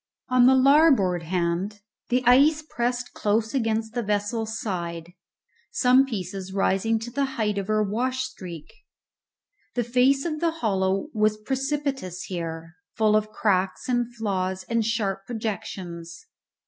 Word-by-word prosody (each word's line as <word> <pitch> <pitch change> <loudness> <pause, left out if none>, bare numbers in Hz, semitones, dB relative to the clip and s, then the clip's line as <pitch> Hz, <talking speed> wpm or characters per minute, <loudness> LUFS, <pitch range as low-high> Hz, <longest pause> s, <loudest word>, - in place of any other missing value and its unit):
On 250 -1 +5
the 265 - +6
larboard 260 - +5
hand 180 +4 -2 0.3
the 250 +1 +2
ice 290 +5 +5
pressed 245 0 -2
close 220 +2 0
against 225 -3 -1
the 240 - -1
vessel's 220 +1 -2
side, 170 -4 -4 0.6
some 255 +1 +4
pieces 190 -4 -5
rising 195 +3 +1
to 225 +2 -6
the 280 +2 0
height 210 -2 0
of 195 - -5
her 215 0 +2
wash 255 +5 -1
streak. 180 - -8 1.0
The 245 - +1
face 255 +4 +3
of 310 -2 -2
the 335 +1 +2 0.2
hollow 190 -1 0
was 215 0 +2
precipitous 270 -5 -3
here, 165 -2 -6 0.2
full 215 -1 +3
of 215 0 +1
cracks 190 -3 0
and 245 -2 +1
flaws 190 -4 -2
and 230 -1 +1
sharp 205 -3 -2
projections. 185 - -5
215 Hz, 135 wpm, -25 LUFS, 190-250 Hz, 1.0 s, the